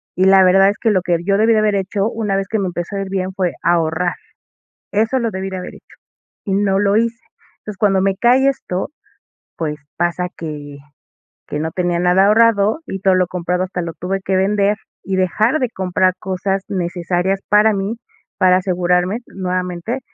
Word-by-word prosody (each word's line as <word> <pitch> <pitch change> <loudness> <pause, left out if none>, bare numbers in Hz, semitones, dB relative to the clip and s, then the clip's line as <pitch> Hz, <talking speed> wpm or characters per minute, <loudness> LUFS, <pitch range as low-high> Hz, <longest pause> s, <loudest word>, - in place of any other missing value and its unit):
y 185 - +2
la 190 0 +6
verdad 195 +2 +5
es 205 - -2
que 225 - +2
lo 190 -3 +2
que 175 -1 0
yo 195 0 +2
debí 225 +2 +4
de 215 - +3
haber 215 -1 +2
hecho, 195 +2 -1
una 210 -3 -2
vez 195 0 -2
que 220 - 0
me 190 - -1
empezó 175 +3 -5
a - - -2
ir 190 - -8
bien, 190 -1 -2
fue 185 -2 -1
ahorrar. 170 +1 +1 0.8
Eso 225 +5 +1
lo 230 -2 -1
debí 190 +1 -4
de 190 - -5
haber 180 - -7
hecho, - - -18 0.5
y 200 - -2
no 195 -1 +1
lo 200 +1 +2
hice. 230 0 0 0.4
Entonces, 210 -2 -9
cuando 195 -1 +3
me 195 0 +2
cae 250 +5 +4
esto, 190 -9 -4 0.7
pues, 150 -2 -3 0.2
pasa 175 +1 0
que 145 -3 -7 0.7
que 150 - -3
no 160 +1 -2
tenía 175 -1 -1
nada 180 +2 +4
ahorrado, 220 +3 +3
y 195 - -5
todo 190 -1 +3
lo 185 0 +2
comprado 180 +1 -2
hasta 180 -1 -4
lo 165 -1 -5
tuve 190 +2 -3
que 190 0 0
vender, 200 +2 +2 0.3
y 190 - -2
dejar 215 - +1
de 250 -2 0
comprar 185 -2 0
cosas 190 +1 -2
necesarias 180 +1 -1
para 210 +1 +5
mí, 200 +4 -2 0.4
para 185 -1 +5
asegurarme 180 +3 0
nuevamente, 185 +5 -3
190 Hz, 195 wpm, -18 LUFS, 180-205 Hz, 0.8 s, la